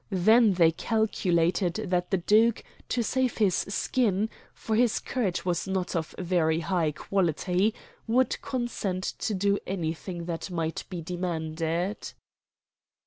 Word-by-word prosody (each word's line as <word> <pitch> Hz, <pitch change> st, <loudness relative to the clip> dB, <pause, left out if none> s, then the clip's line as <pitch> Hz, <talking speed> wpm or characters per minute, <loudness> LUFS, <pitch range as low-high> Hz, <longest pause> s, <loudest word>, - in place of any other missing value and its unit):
Then 215 Hz, +3 st, +5 dB
they 170 Hz, -3 st, +5 dB
calculated 180 Hz, -3 st, +1 dB
that 180 Hz, -4 st, -1 dB
the 195 Hz, -, +2 dB
duke, 215 Hz, +5 st, +3 dB, 0.3 s
to 240 Hz, -, +1 dB
save 255 Hz, +2 st, 0 dB
his 205 Hz, -5 st, +3 dB
skin 210 Hz, +1 st, 0 dB, 0.2 s
for 220 Hz, -, -3 dB
his 235 Hz, 0 st, +3 dB
courage 200 Hz, -10 st, -2 dB
was 175 Hz, 0 st, -1 dB
not 190 Hz, -2 st, -2 dB
of 160 Hz, -2 st, -3 dB
very 170 Hz, -3 st, +1 dB
high 170 Hz, -2 st, 0 dB
quality 185 Hz, +5 st, 0 dB, 0.3 s
would 255 Hz, +3 st, +2 dB
consent 240 Hz, -8 st, -3 dB
to 210 Hz, -, -2 dB
do 200 Hz, +1 st, +1 dB
anything 170 Hz, -1 st, -3 dB
that 170 Hz, +2 st, -4 dB
might 165 Hz, -2 st, -3 dB
be 175 Hz, -3 st, -5 dB
demanded. 170 Hz, +1 st, -3 dB
185 Hz, 130 wpm, -27 LUFS, 170-215 Hz, 0.3 s, Then